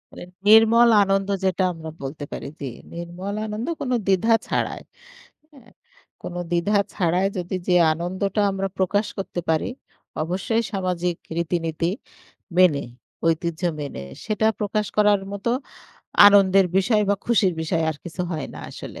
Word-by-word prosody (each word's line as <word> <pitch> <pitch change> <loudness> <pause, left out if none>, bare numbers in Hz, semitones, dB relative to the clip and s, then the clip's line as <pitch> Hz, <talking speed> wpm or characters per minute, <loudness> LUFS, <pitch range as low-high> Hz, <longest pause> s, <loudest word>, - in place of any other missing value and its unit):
এ - - -8 0.2
নির্মল 225 +2 +7
আনন্দ 195 0 0 0.2
যেটা 190 0 +1
আমরা 160 -1 -8
বলতে 140 +2 -6
পারি, - - -6
জি। 140 - -5 0.3
নির্মল 175 +4 -6
আনন্দ 215 +2 -4
কোনো 255 -2 0
দ্বিধা 195 +4 +3
ছাড়াই - - -2 0.7
হ্যাঁ? 250 -4 -18 0.5
কোনো 175 0 -6
দ্বিধা 175 +5 +2 0.2
ছাড়াই 180 +2 +1
যদি 180 +1 -3
যে 180 - +3 0.2
আনন্দটা 185 +5 -2
আমরা 195 0 -2
প্রকাশ 200 +2 +1
করতে 190 -2 -4
পারি 160 -1 +1 0.5
অবশ্যই 195 +7 -1
সামাজিক 180 -2 -1 0.2
রীতিনীতি 165 -1 -1 0.7
মেনে 170 -6 +5 0.4
ঐতিহ্য 165 0 -1 0.2
মেনে 140 - -6 0.2
সেটা 215 0 +1
প্রকাশ 210 0 -1
করার 210 -1 +4
মতো 200 +3 -3 0.8
আনন্দের 195 -2 +6
বিষয় 210 +2 +3
বা 205 - +4
খুশির 205 -6 +3
বিষয় 160 +1 0
আর 155 - -6
কিছু 175 +1 -7
হয় 155 -4 -3
না - - -8
আসলে, - - -9
190 Hz, 140 wpm, -23 LUFS, 170-205 Hz, 0.8 s, নির্মল